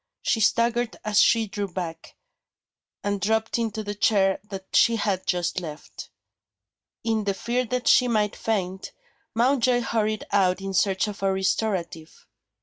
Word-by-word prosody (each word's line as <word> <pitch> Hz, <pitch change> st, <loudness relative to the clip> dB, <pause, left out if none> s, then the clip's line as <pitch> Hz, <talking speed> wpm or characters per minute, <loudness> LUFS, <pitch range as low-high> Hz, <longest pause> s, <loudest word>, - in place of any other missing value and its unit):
She 230 Hz, -, +1 dB
staggered 235 Hz, +2 st, +1 dB
as 215 Hz, -1 st, +2 dB
she 225 Hz, -1 st, +4 dB
drew 205 Hz, -1 st, -4 dB
back, 170 Hz, -3 st, -7 dB, 0.9 s
and 205 Hz, -1 st, -2 dB
dropped 220 Hz, +3 st, 0 dB
into 220 Hz, -1 st, -2 dB
the 205 Hz, 0 st, -4 dB
chair 195 Hz, -2 st, +2 dB
that 190 Hz, -1 st, -7 dB
she 230 Hz, -, +5 dB
had 200 Hz, -4 st, -1 dB
just 175 Hz, 0 st, 0 dB
left. 155 Hz, -3 st, -9 dB, 0.9 s
In 220 Hz, -2 st, 0 dB
the 200 Hz, -1 st, 0 dB
fear 240 Hz, +5 st, -1 dB
that 250 Hz, +1 st, -3 dB
she 250 Hz, -, +5 dB
might 210 Hz, -3 st, +1 dB
faint, 190 Hz, -4 st, -3 dB, 0.4 s
Mountjoy 245 Hz, 0 st, +3 dB
hurried 215 Hz, -2 st, -1 dB
out 185 Hz, -2 st, +2 dB
in 195 Hz, 0 st, -5 dB
search 190 Hz, +2 st, +2 dB
of 205 Hz, -2 st, -7 dB
a 195 Hz, 0 st, +2 dB
restorative. 190 Hz, -4 st, -2 dB
205 Hz, 145 wpm, -25 LUFS, 190-225 Hz, 0.9 s, she